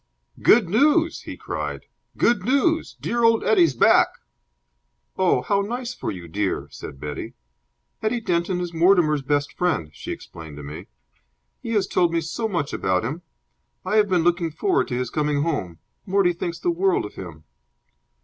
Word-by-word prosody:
"Good 220 Hz, -4 st, +5 dB
news!" 300 Hz, -, +3 dB
he -, -, -7 dB
cried. -, -, -5 dB, 0.3 s
"Good 235 Hz, -6 st, +2 dB
news! 280 Hz, -, +1 dB
Dear 235 Hz, 0 st, -1 dB
old 230 Hz, -1 st, +4 dB
Eddie's 175 Hz, -10 st, +4 dB
back!" -, -, +5 dB, 1.1 s
"Oh, 185 Hz, -1 st, +2 dB
how 200 Hz, -1 st, +1 dB
nice 240 Hz, +4 st, -4 dB
for -, -, -5 dB
you, 90 Hz, -2 st, -6 dB
dear!" 100 Hz, +3 st, -2 dB
said 70 Hz, -, -9 dB
Betty. 75 Hz, +1 st, -6 dB, 0.7 s
"Eddie 220 Hz, +2 st, 0 dB
Denton 175 Hz, -2 st, 0 dB
is 175 Hz, -1 st, -4 dB
Mortimer's 165 Hz, -3 st, +4 dB
best 145 Hz, +1 st, -1 dB
friend," 160 Hz, -, -1 dB
she -, -, -7 dB
explained 80 Hz, -3 st, -9 dB
to 75 Hz, -, -8 dB
me. 75 Hz, +6 st, -8 dB, 0.7 s
"He 230 Hz, -, -4 dB
has 205 Hz, -3 st, +2 dB
told 175 Hz, -3 st, +1 dB
me 170 Hz, -, +2 dB
so 165 Hz, +8 st, -3 dB
much 170 Hz, -9 st, -2 dB
about 95 Hz, +2 st, 0 dB
him. 150 Hz, +8 st, -4 dB, 0.6 s
I 215 Hz, -, +1 dB
have 210 Hz, -1 st, +4 dB
been 180 Hz, -3 st, +2 dB
looking 175 Hz, -1 st, +1 dB
forward 370 Hz, -, 0 dB
to 125 Hz, -, -3 dB
his 125 Hz, -1 st, -3 dB
coming 150 Hz, -2 st, 0 dB
home. 120 Hz, -, -2 dB, 0.3 s
Mortie 190 Hz, -2 st, +3 dB
thinks 170 Hz, 0 st, -4 dB
the 175 Hz, +1 st, 0 dB
world 185 Hz, -, +1 dB
of 105 Hz, -, -9 dB
him." 85 Hz, -4 st, -9 dB
175 Hz, 170 wpm, -23 LUFS, 130-210 Hz, 1.1 s, Good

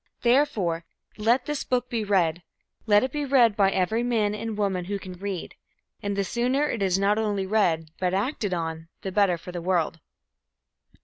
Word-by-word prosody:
Therefore, 220 Hz, -, +2 dB, 0.4 s
let 235 Hz, +4 st, +2 dB
this 295 Hz, -1 st, -2 dB
book 250 Hz, -1 st, 0 dB
be 235 Hz, -3 st, -2 dB
read; 180 Hz, -5 st, +1 dB, 0.5 s
let 205 Hz, +1 st, +5 dB
it 260 Hz, -, -1 dB
be 295 Hz, +1 st, -2 dB
read 250 Hz, -6 st, +4 dB
by 195 Hz, -2 st, +4 dB
every 195 Hz, +5 st, +1 dB
man 225 Hz, -4 st, +1 dB
and 215 Hz, 0 st, -4 dB
woman 190 Hz, -4 st, 0 dB
who 200 Hz, +2 st, -2 dB
can 185 Hz, -1 st, -9 dB
read. 190 Hz, 0 st, -5 dB, 0.5 s
And 200 Hz, 0 st, -2 dB
the 200 Hz, -, +1 dB
sooner 250 Hz, +8 st, 0 dB
it 230 Hz, -, -3 dB
is 190 Hz, -1 st, +2 dB
not 200 Hz, +2 st, +2 dB
only 205 Hz, -3 st, 0 dB
read 170 Hz, -6 st, +1 dB
but 180 Hz, -1 st, +1 dB
acted 205 Hz, +1 st, -1 dB
on, 165 Hz, -2 st, -3 dB, 0.2 s
the 190 Hz, -, -3 dB
better 195 Hz, -3 st, +3 dB
for 180 Hz, -, -9 dB
the 175 Hz, -1 st, -5 dB
world. 170 Hz, -2 st, 0 dB
200 Hz, 185 wpm, -26 LUFS, 180-230 Hz, 0.5 s, let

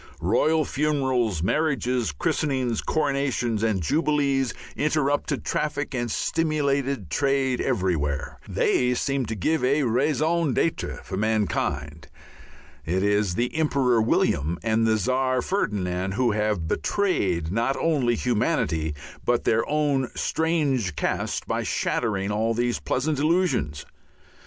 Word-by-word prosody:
Royal 150 Hz, -, +2 dB
funerals, 130 Hz, -, 0 dB
marriages, 125 Hz, -, 0 dB
christenings, 125 Hz, -, -1 dB
coronations, 140 Hz, -7 st, 0 dB
and 110 Hz, -5 st, 0 dB
jubilees 140 Hz, -, +1 dB, 0.2 s
interrupted 145 Hz, -1 st, 0 dB
traffic 145 Hz, -1 st, -2 dB
and 120 Hz, -2 st, -2 dB
stimulated 140 Hz, -, 0 dB
trade 135 Hz, -, +1 dB
everywhere. 85 Hz, -, -1 dB
They 125 Hz, 0 st, +2 dB
seemed 135 Hz, -1 st, -1 dB
to 110 Hz, -, -3 dB
give 145 Hz, -, 0 dB
a 140 Hz, +3 st, +2 dB
raison 150 Hz, +4 st, +1 dB
d'être 165 Hz, -, -1 dB
for 95 Hz, -, -5 dB
mankind. 100 Hz, -8 st, -1 dB, 0.8 s
It 90 Hz, +5 st, -1 dB
is 105 Hz, -3 st, +1 dB
the 120 Hz, +6 st, -1 dB
Emperor 135 Hz, -7 st, +2 dB
William 85 Hz, -6 st, +1 dB
and 115 Hz, 0 st, +2 dB
the 110 Hz, 0 st, +3 dB
Czar 130 Hz, +4 st, +1 dB
Ferdinand 95 Hz, -, -1 dB
who 125 Hz, -1 st, +2 dB
have 105 Hz, -5 st, -1 dB
betrayed 90 Hz, -, 0 dB
not 115 Hz, +6 st, 0 dB
only 135 Hz, -8 st, +1 dB
humanity 80 Hz, -10 st, 0 dB, 0.3 s
but 120 Hz, -1 st, +1 dB
their 110 Hz, +1 st, +2 dB
own 145 Hz, -4 st, +1 dB
strange 145 Hz, -, 0 dB
caste -, -, -2 dB
by -, -, -1 dB
shattering 105 Hz, -4 st, -1 dB
all 110 Hz, +2 st, 0 dB
these 120 Hz, +1 st, 0 dB
pleasant 145 Hz, +2 st, -1 dB
illusions. 155 Hz, -, +1 dB
125 Hz, 120 wpm, -25 LUFS, 105-145 Hz, 0.8 s, the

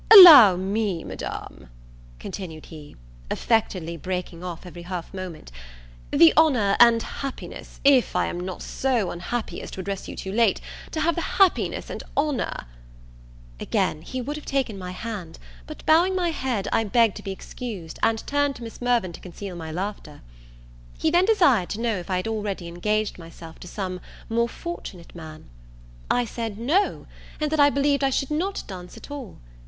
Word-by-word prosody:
"Allow 315 Hz, -, +12 dB
me, 195 Hz, -1 st, -1 dB
Madam," -, -, -7 dB, 0.5 s
continued 160 Hz, -, -7 dB
he, 150 Hz, -3 st, -12 dB, 0.3 s
affectedly 185 Hz, -7 st, 0 dB
breaking 180 Hz, 0 st, -5 dB
off 175 Hz, -1 st, -6 dB
every 175 Hz, -1 st, -9 dB
half 175 Hz, 0 st, -6 dB
moment, 180 Hz, -, -7 dB, 0.6 s
"the 165 Hz, -, +7 dB
honour 250 Hz, -11 st, +4 dB
and 235 Hz, -1 st, +6 dB
happiness 275 Hz, -2 st, -7 dB
if 275 Hz, -3 st, +4 dB
I -, -, +2 dB
am 175 Hz, -, -4 dB
not 180 Hz, 0 st, -5 dB
so 245 Hz, -9 st, 0 dB
unhappy 215 Hz, +7 st, -4 dB
as -, -, -8 dB
to -, -, -8 dB
address 195 Hz, +1 st, -4 dB
you -, -, -7 dB
too 190 Hz, -, -5 dB
late 220 Hz, -1 st, +3 dB, 0.3 s
to 315 Hz, -, -3 dB
have 335 Hz, +2 st, +2 dB
the 340 Hz, -, -2 dB, 0.2 s
happiness 385 Hz, -2 st, +2 dB
and -, -, -5 dB, 0.2 s
honour 285 Hz, -, -1 dB, 0.5 s
" -, -, -22 dB
Again 155 Hz, -, 0 dB
he 255 Hz, +10 st, -5 dB
would 290 Hz, +5 st, -4 dB
have 300 Hz, -, -9 dB
taken 265 Hz, -6 st, -1 dB
my 185 Hz, -2 st, -6 dB
hand; 185 Hz, -4 st, -6 dB, 0.3 s
but 310 Hz, -, -10 dB
bowing 345 Hz, +4 st, +4 dB
my 355 Hz, -2 st, +1 dB
head, 255 Hz, -9 st, -2 dB
I 225 Hz, -, +3 dB
begged 225 Hz, 0 st, +3 dB
to -, -, -9 dB
be 195 Hz, -, -4 dB
excused, 190 Hz, -4 st, -7 dB
and 225 Hz, -1 st, +1 dB
turned 285 Hz, -1 st, +1 dB
to 240 Hz, -, -9 dB
Miss 225 Hz, +1 st, -9 dB
Mirvan 240 Hz, -8 st, +1 dB
to -, -, -11 dB
conceal 185 Hz, +1 st, -8 dB
my 160 Hz, -2 st, -6 dB
laughter. 180 Hz, -4 st, -5 dB, 0.8 s
He 320 Hz, -, +1 dB
then 350 Hz, +2 st, +4 dB
desired 285 Hz, -, +4 dB
to 210 Hz, -, -4 dB
know 230 Hz, -3 st, 0 dB
if 175 Hz, 0 st, -8 dB
I 185 Hz, -, +1 dB
had 185 Hz, +3 st, -2 dB
already 205 Hz, -5 st, -3 dB
engaged 210 Hz, +5 st, -1 dB
myself 165 Hz, -1 st, -12 dB
to -, -, -10 dB
some 185 Hz, -1 st, -5 dB, 0.3 s
more 235 Hz, +1 st, +1 dB
fortunate 225 Hz, -, -8 dB
man? 160 Hz, -2 st, -10 dB, 0.6 s
I 245 Hz, 0 st, +2 dB
said 225 Hz, -2 st, -5 dB
No, 310 Hz, -, +1 dB, 0.3 s
and 305 Hz, -1 st, -1 dB
that 315 Hz, -, 0 dB
I 285 Hz, 0 st, +7 dB
believed 280 Hz, 0 st, +1 dB
I 270 Hz, -, +4 dB
should 275 Hz, +2 st, -1 dB
not 370 Hz, +6 st, -1 dB
dance 180 Hz, -2 st, -9 dB
at -, -, -12 dB
all. 275 Hz, -8 st, -7 dB
210 Hz, 180 wpm, -24 LUFS, 180-275 Hz, 0.8 s, Allow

